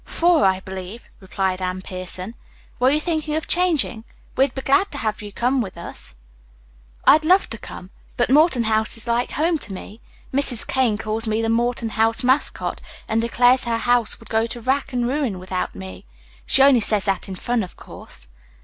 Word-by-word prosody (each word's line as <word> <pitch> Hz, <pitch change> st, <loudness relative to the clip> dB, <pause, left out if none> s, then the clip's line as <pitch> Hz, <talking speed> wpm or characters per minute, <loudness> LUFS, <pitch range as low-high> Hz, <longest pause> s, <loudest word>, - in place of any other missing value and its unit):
"Four, 340 Hz, -, +2 dB
I 190 Hz, 0 st, +2 dB
believe," 190 Hz, +4 st, -8 dB
replied 190 Hz, -1 st, -2 dB
Anne 185 Hz, 0 st, -3 dB
Pierson. 185 Hz, +3 st, -6 dB, 0.5 s
"Were 250 Hz, +1 st, +4 dB
you 295 Hz, +2 st, +2 dB
thinking 310 Hz, -2 st, -2 dB
of 315 Hz, +1 st, -3 dB
changing? 325 Hz, -11 st, +1 dB, 0.3 s
We'd 265 Hz, -1 st, +2 dB
be 265 Hz, -, -5 dB
glad 390 Hz, +9 st, +3 dB
to -, -, -4 dB
have 215 Hz, -4 st, -2 dB
you 205 Hz, -1 st, -8 dB, 0.3 s
with 190 Hz, -6 st, -6 dB
us." 170 Hz, -, -9 dB, 0.9 s
"I'd 310 Hz, +2 st, +6 dB
love 370 Hz, +5 st, +3 dB
to 225 Hz, -, -6 dB
come, 185 Hz, +1 st, -10 dB, 0.3 s
but 240 Hz, +1 st, +1 dB
Morton 295 Hz, -4 st, +4 dB
House 220 Hz, 0 st, 0 dB
is 225 Hz, -, -9 dB
like 240 Hz, +1 st, -1 dB
home 320 Hz, +2 st, +1 dB
to 220 Hz, -, -6 dB
me. 205 Hz, +4 st, -10 dB, 0.3 s
Mrs. 265 Hz, -4 st, +2 dB
Kane 250 Hz, -5 st, +1 dB
calls 220 Hz, +1 st, -3 dB
me 215 Hz, 0 st, 0 dB
the 225 Hz, 0 st, 0 dB
Morton 235 Hz, 0 st, 0 dB
House 225 Hz, +2 st, +1 dB
Mascot, 260 Hz, +3 st, +1 dB, 0.3 s
and 220 Hz, +1 st, +1 dB
declares 245 Hz, +2 st, +3 dB
her 230 Hz, -1 st, 0 dB
house 240 Hz, -1 st, +1 dB
would 230 Hz, -, -14 dB
go 225 Hz, +1 st, +1 dB
to 240 Hz, -, -6 dB
rack 265 Hz, +4 st, -1 dB
and 245 Hz, -2 st, -1 dB
ruin 260 Hz, -7 st, -1 dB
without 185 Hz, 0 st, -4 dB
me. 95 Hz, -3 st, -9 dB, 0.4 s
She 270 Hz, -, +5 dB
only 270 Hz, -4 st, +6 dB
says 210 Hz, -1 st, +3 dB
that 195 Hz, -1 st, -1 dB
in 190 Hz, -, -5 dB
fun, 240 Hz, +5 st, -1 dB
of 185 Hz, -, -8 dB
course." -, -, -11 dB
230 Hz, 190 wpm, -21 LUFS, 200-265 Hz, 0.9 s, I'd